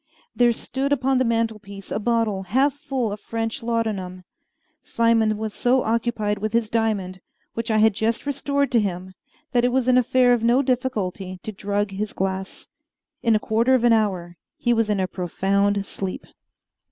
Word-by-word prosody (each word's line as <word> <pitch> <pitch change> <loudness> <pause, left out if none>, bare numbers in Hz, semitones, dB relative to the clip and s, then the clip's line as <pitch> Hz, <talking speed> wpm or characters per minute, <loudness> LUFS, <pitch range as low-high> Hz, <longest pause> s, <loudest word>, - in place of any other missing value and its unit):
There 240 -1 +4
stood 270 +4 -3
upon 265 -1 +2
the - - +3
mantelpiece 220 -4 -3
a - - -1
bottle 225 -3 0
half 265 +9 +2
full 265 -6 -3
of 205 - -5
French 225 0 -4
laudanum. 215 -6 -2 0.6
Simon 225 -2 +2
was 215 -1 -4
so 250 +1 +2
occupied 225 -2 -1
with 215 +1 -3
his 230 -2 +1
diamond, 200 -5 -1 0.3
which 230 +1 -4
I 220 - +2
had 220 0 +5
just 225 +5 -1
restored 280 -1 -1
to 240 - +4
him, 185 -2 -3 0.4
that 245 -2 +2
it 245 - +3
was 255 -1 +1
an 255 0 +5
affair 250 0 +3
of 240 - +1
no 240 +4 +3
difficulty 205 -8 -2
to 215 - -4
drug 205 0 -2
his 205 +2 -4
glass. 190 0 -4 0.5
In 230 -2 +3
a - - +3
quarter 230 +5 +2
of 245 - +1
an 240 -1 +5
hour 185 -6 0 0.2
he 240 - +1
was 225 -2 +1
in 205 -2 +1
a 190 - +1
profound 195 +2 0
sleep. 190 -2 -5
225 Hz, 175 wpm, -23 LUFS, 200-240 Hz, 0.6 s, had